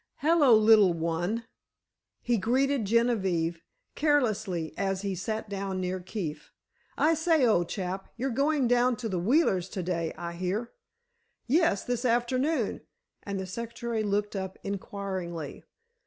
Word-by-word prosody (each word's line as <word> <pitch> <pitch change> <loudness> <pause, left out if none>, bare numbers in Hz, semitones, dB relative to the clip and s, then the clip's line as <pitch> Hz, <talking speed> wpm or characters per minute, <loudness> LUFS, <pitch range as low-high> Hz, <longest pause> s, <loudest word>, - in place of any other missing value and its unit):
"Hello, 295 -6 +5
little 215 -4 +6
one," 170 +7 -2 0.8
he 240 - +2
greeted 260 +3 +1
Genevieve, 190 -7 +1 0.3
carelessly, 215 - 0
as 195 0 -1
he 200 -1 -1
sat 215 +4 -3
down 195 -2 -3
near 185 0 -2
Keefe. 180 -4 -5 0.5
"I 315 +2 +4
say, 320 -3 +3
old 175 -7 +2
chap, 190 0 -4
you're 265 +3 -1
going 280 +1 +2
down 245 +1 +3
to 235 -1 -4
the 185 -4 -2
Wheelers' 190 - +2
to 185 -2 -4
day, 170 -2 -1
I 170 0 -5
hear." 185 +7 -3 0.7
"Yes; 290 - +2
this 245 0 -2
afternoon," 255 +5 +1 0.4
and 200 -1 -4
the 190 - -3
secretary 235 +3 -4
looked 205 0 -1
up 190 -1 -4
inquiringly. 190 -5 -5
205 Hz, 135 wpm, -28 LUFS, 185-245 Hz, 0.8 s, little